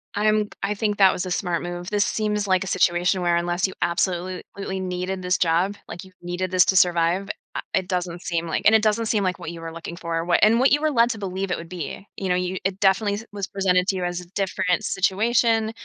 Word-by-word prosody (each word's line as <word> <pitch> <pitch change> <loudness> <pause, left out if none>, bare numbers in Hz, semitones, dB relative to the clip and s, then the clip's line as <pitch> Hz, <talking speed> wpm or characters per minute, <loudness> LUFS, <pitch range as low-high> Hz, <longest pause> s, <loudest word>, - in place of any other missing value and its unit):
I'm 215 0 +2
I 205 +1 0
think 210 0 -1
that 195 -2 +6
was 180 - -3
a 180 - -5
smart 175 -2 -1
move. 175 +1 -5
This 205 -1 +2
seems 210 -1 -1
like 185 0 +2
a - - -7
situation 180 0 +2
where, 175 -1 +2
unless 175 +2 0
you 190 - -8
absolutely 185 +2 -2
needed 185 +1 -3
this 180 0 +1
job, 175 +4 +1
like 175 - -8
you 190 - -15
needed 175 +1 -3
this 185 -1 +5
to 190 - +1
survive, 175 +2 +3 0.3
I - - -2
it 190 -1 0
doesn't 180 -2 -3
seem 170 -1 -2
like 160 - -2
and 220 - +7
it 220 - +5
doesn't 220 +1 +1
seem 210 -2 +1
like 180 -1 -1
what 160 - -6
you 165 -1 -9
were 165 0 -6
looking 170 +1 -7
for, 165 -1 -3
what 175 - +3
and 225 +3 +5
what 265 +1 +4
you 295 - +3
were 310 -1 +1
led 235 -2 +4
to 225 - -5
believe 195 -1 -4
it - - 0
would 165 0 -9
be. 180 +2 -6
You 190 - -3
know, 180 - +3
you 180 +1 -2
it 195 0 -1
definitely 200 +1 +3
su 225 - -8
was 200 -2 -4
presented 185 -2 +1
to 195 - +1
you 180 - -2
as 175 0 -2
a 175 - -14
different 190 -2 0
situation. 225 +3 +1
185 Hz, 250 wpm, -23 LUFS, 175-205 Hz, 0.3 s, and